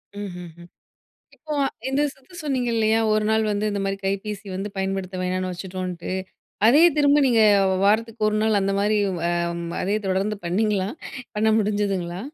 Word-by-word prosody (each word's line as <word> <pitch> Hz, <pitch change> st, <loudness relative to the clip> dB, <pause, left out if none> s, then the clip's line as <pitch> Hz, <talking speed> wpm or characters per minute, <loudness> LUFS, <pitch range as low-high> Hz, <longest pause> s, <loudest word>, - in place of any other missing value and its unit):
ம், 205 Hz, -1 st, -5 dB
ம், 175 Hz, -, -9 dB
ம். 175 Hz, -, -14 dB, 0.7 s
இப்போ 305 Hz, -1 st, -6 dB, 0.3 s
இந்த 270 Hz, +2 st, +1 dB
சுத்து 270 Hz, +7 st, -21 dB
சொன்னீங்க 260 Hz, -5 st, -1 dB
இல்லயா! 220 Hz, 0 st, +3 dB
ஒரு 215 Hz, 0 st, +2 dB
நாள் 220 Hz, 0 st, +2 dB
வந்து 210 Hz, +1 st, 0 dB
இந்தமாரி 195 Hz, -1 st, -2 dB
கைபேசி 200 Hz, +1 st, -3 dB
வந்து 195 Hz, +2 st, -3 dB
பயன்படுத்த 190 Hz, -1 st, -3 dB
வேணான்னு 185 Hz, 0 st, -1 dB
வச்சுட்டோன்ட்டு. 180 Hz, -1 st, -5 dB, 0.5 s
அதே 285 Hz, +7 st, +6 dB
திரும்ப 290 Hz, 0 st, +4 dB
நீங்க 235 Hz, -3 st, +3 dB, 0.4 s
வாரத்துக்கு 220 Hz, +2 st, +1 dB
ஒரு 215 Hz, -, 0 dB
நாள் 220 Hz, -2 st, +3 dB
அந்தமாரி 200 Hz, +2 st, +1 dB, 0.2 s
வ -, -, -6 dB, 0.4 s
ம் 170 Hz, -, -5 dB, 0.2 s
அதே 200 Hz, +3 st, 0 dB
தொடர்ந்து 195 Hz, +3 st, 0 dB
பண்ணீங்களா? 195 Hz, +2 st, 0 dB, 0.5 s
பண்ண 220 Hz, +1 st, +2 dB
முடிஞ்சுதுங்களா? 200 Hz, -4 st, -1 dB
205 Hz, 150 wpm, -23 LUFS, 190-220 Hz, 0.7 s, அதே